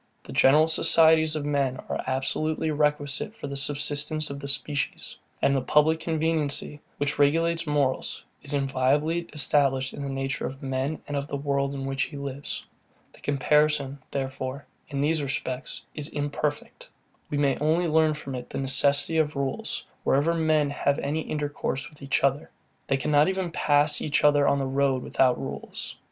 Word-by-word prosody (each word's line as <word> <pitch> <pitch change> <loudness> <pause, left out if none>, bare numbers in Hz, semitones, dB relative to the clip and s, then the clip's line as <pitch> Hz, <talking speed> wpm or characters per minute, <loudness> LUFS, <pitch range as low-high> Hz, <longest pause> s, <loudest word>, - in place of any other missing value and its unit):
The - - -10
general 150 +4 +5
societies 160 -1 +4
of 150 -2 -3
men 140 -3 0
are - - -3
absolutely 155 +4 -1
requisite 150 +5 0
for - - -8
the 140 0 -5
subsistence 145 +2 +1
of 140 - -6
the 140 - -6
species; 145 +1 -2 0.3
and 140 - +4
the 135 - +1
public 150 +4 +3
conveniency, 155 -3 -1 0.2
which 145 0 -2
regulates 165 +3 +2
morals, 145 -3 0 0.2
is - - -5
inviolably 145 +5 +1
established 135 -3 +2
in - - -7
the 140 - -3
nature 135 0 -2
of 135 +1 -9
man, 135 +3 -2
and 145 - -4
of 140 0 -2
the 145 - -3
world, 140 0 -1
in 135 -1 -4
which 135 0 -2
he 145 - -9
lives. 140 0 -6 0.5
The - - -18
comparison, 145 -1 +1
therefore, 135 0 -4 0.2
in 140 -1 -2
these 155 +2 +1
respects, 135 -1 -4
is 150 -1 -4
very 145 -1 -2
imperfect. 145 +1 -4 0.4
We 145 - -2
may 140 -2 +1
only 160 +4 +2
learn 155 -1 +3
from 140 -3 -7
it 125 -1 -6
the - - -5
necessity 140 +4 +3
of 150 -1 0
rules, 140 -1 -2 0.2
wherever 145 +5 +2
men 155 -3 +2
have 140 0 0
any 150 +3 -2
intercourse 145 -2 -3
with 150 - -19
each 140 0 0
other. 140 +1 +1 0.4
They 135 - +2
cannot 150 +2 +3
even 190 -2 -2
pass 145 -1 +2
each 150 -1 0
other 145 -1 +5
on 140 - +3
the 135 - -1
road 135 -1 +1
without 130 -2 +2
rules. - - -6
145 Hz, 170 wpm, -26 LUFS, 135-155 Hz, 0.5 s, general